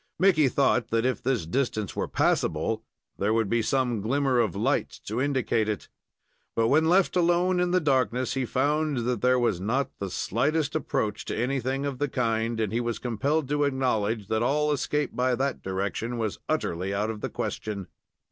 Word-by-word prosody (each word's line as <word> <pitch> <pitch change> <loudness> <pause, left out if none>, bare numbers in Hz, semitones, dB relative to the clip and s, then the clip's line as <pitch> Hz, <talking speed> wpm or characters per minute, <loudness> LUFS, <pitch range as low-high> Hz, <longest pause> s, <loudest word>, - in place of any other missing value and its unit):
Mickey 175 -6 +4
thought 130 -4 +2
that 115 +1 0
if 130 -4 0
this 125 -9 0
distance 110 +1 -1
were - - -1
passable, 110 +8 0 0.4
there 105 +3 +2
would 115 -2 +2
be 115 0 +3
some 125 -2 0
glimmer 130 +3 +1
of 110 -8 +1
light - - +1 0.2
to 110 +5 -2
indicate 130 -6 +1
it. 105 - -4 0.7
But, 115 0 +2
when 160 +3 +4
left 185 +1 +3
alone 180 +1 +3
in 180 0 +2
the 185 +1 +3
darkness, 130 - +1
he 135 - -1
found 145 0 0
that 125 -3 -1
there 125 0 +4
was 115 -8 +1
not 125 +8 0
the 100 - -3
slightest 145 - 0
approach 110 -8 -1
to - - -3
anything 130 +3 -1
of 140 -3 -3
the 145 0 0
kind, 115 -2 0
and 110 -2 -1
he 120 - +1
was 120 -1 -2
compelled 135 +5 -1
to 145 0 +1
acknowledge 115 -7 0
that 110 0 +1
all 150 +5 +2
escape 150 +1 -1
by 125 0 +2
that 135 +1 -1
direction 100 +5 -3
was 110 -3 -2
utterly 95 +4 -1
out 105 +2 0
of 105 -2 -8
the - - -2
question. 100 -3 -4
125 Hz, 185 wpm, -27 LUFS, 110-140 Hz, 0.7 s, Mickey